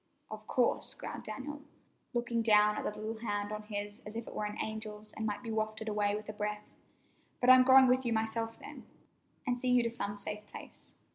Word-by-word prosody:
"Of 215 0 -8
course," 245 -2 +1
growled - - -7
Dan, 280 +7 -6 0.5
looking 235 -1 0
down 210 -1 +5
at - - -2
the 210 - -10
little 220 +1 -4
hand 205 -2 -2
on 215 0 -4
his 205 -1 -5
as 210 +1 -10
if 230 0 -5
it - - -8
were 210 - -2
an 210 0 -4
angel's 215 -1 -5
and 220 - -3
might 210 +3 -3
be 230 - -4
wafted 220 0 -2
away 210 -1 +1
with 215 0 -6
a 215 - -5
breath. 210 0 -3 0.7
"But 250 0 +6
I'm 255 0 +9
going 260 +1 +8
with 255 +1 +3
you 240 - -1
myself, 225 0 -1
then, - - -11 0.6
and 245 0 0
see 255 - 0
you 250 -1 +5
to 230 - -1
some 205 -3 -3
safe 210 +1 -5
place." - - -12
220 Hz, 215 wpm, -32 LUFS, 210-235 Hz, 0.7 s, I'm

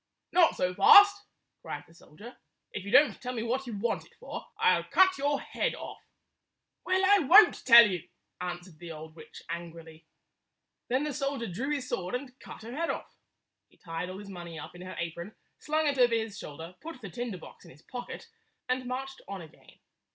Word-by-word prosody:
"Not 350 -2 +4
so 180 0 -1
fast!" 405 - +7 0.4
cried - - -6
the - - -20
soldier. 205 +9 -14 0.4
"If 205 - -6
you - - -6
don't 265 -4 +5
tell 250 0 -4
me 225 - -2
what 255 +3 -2
you 225 -4 -5
want 230 +3 -1
it - - -22
for, - - -8
I - - +4
'll - - -2
cut 375 -4 +4
your 285 0 +1
head - - -2
off." - - -9 0.8
"Well, 375 +1 +1
I 405 +1 +6
won't 380 +7 +6
tell 235 -2 +10
you," 180 -5 -5 0.3
answered 175 -2 -7
the 175 -1 -8
old 155 0 -9
witch, - - -13
angrily. 165 -1 -8 0.8
Then 260 +3 0
the 300 -1 -3
soldier 275 -3 -2
drew 225 +8 -4
his 290 -3 -2
sword 180 +5 -3
and 250 0 -6
cut - - -11
her 235 +3 -8
head 335 +2 -2
off. - - -5 0.5
He - - -27
tied 165 +1 -5
all 185 - -7
his 200 0 -10
money 170 -3 -8
up 150 - -9
in 175 - -12
her 185 0 -8
apron, 170 +4 -5 0.2
slung 310 +1 0
it 285 -2 0
over 240 -2 +5
his 220 -2 -3
shoulder, 165 -1 -9
put 330 -4 -9
the 200 - -7
tinder 235 -1 -5
box - - -14
in - - -15
his 145 +4 -18
pocket, 245 - -8 0.4
and 255 0 -1
marched 270 +2 -5
on 195 -3 -6
again. 160 - -18
230 Hz, 205 wpm, -29 LUFS, 175-275 Hz, 0.8 s, tell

